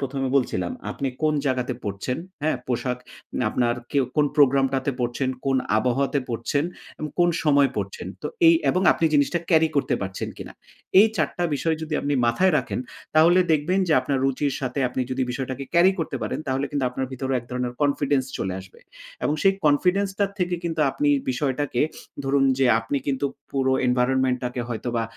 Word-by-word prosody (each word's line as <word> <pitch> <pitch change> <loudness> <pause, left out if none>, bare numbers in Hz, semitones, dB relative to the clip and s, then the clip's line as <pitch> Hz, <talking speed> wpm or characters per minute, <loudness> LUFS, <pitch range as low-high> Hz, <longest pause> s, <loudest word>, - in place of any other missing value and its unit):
১ম 135 0 -3
এ - - -1
বলছিলাম, 135 - 0 0.2
আপনি 140 - -2
কোন 155 -1 +3
জায়গাতে 130 -2 0
পড়ছেন, 100 +5 -3 0.3
হ্যাঁ? 155 -3 +1
পোশাক 125 0 -1 0.4
নে - - 0
আপনার 120 -1 +1 0.2
কেউ, 140 -2 +3
কোন 150 -1 +4
প্রোগ্রামটাতে 135 -1 +3
পড়ছেন, 120 +2 -1 0.2
কোন 135 -1 +2 0.2
আবহাওয়াতে 135 +5 +1
পড়ছেন 120 +5 -1 0.3
এবং 155 - -4
কোন 175 0 +5 0.2
সময় 140 -2 +4
পড়ছেন। 470 - -4 0.2
তো - - -2 0.2
এই 330 - +8 0.2
এবং 185 - 0
আপনি - - -2
জিনিসটা 145 +4 +3
ক্যারি 160 -1 +5
করতে 140 - +1
পারছেন 95 0 -4
কিনা? - - -8 0.5
এই 215 - +7
৪ - - +2
টা 175 - -2
বিষয় 160 +3 0
যদি 155 -1 -3
আপনি 145 0 -1
মাথায় 185 +11 +3
রাখেন, - - -3 0.4
তাহলে 165 +3 +6
দেখবেন 160 +5 +1
যে 160 - +3
আপনার 140 -2 -1
রুচির 135 +1 0
সাথে 130 0 -3
আপনি 125 - -3
যদি 130 +1 -1
বিষয়টাকে 130 +1 -4
ক্যারি 175 +3 +6
করে 190 - -5
করতে - - -5
পারেন, - - -3
তাহলে 135 +2 0
কিন্তু 140 -3 -1
আপনার 130 +1 -3
ভেতরে 130 +1 -2
এক 120 - -9
ধরনের 125 -1 -2
কনফিডেন্স 140 -1 +1
চলে 95 -1 -2
আসবে। 95 0 -16 0.4
এবং 150 - +1
সেই 195 0 +5
কনফিডেন্স 180 +7 +3
টার 200 -1 +1
থেকে 180 -1 0
কিন্তু 165 -2 -2
আপনি 145 - 0 0.2
বিষয়টাকে 130 0 -1 0.4
ধরুন, 135 0 +2
যে 135 - +4
আপনি 115 +5 -3
কিন্তু 140 0 0 0.3
পুরো 130 -1 +1 0.2
environment 125 +1 +2
টাকে 125 0 -3
হয়তোবা 120 0 -2
135 Hz, 185 wpm, -24 LUFS, 125-155 Hz, 0.5 s, এই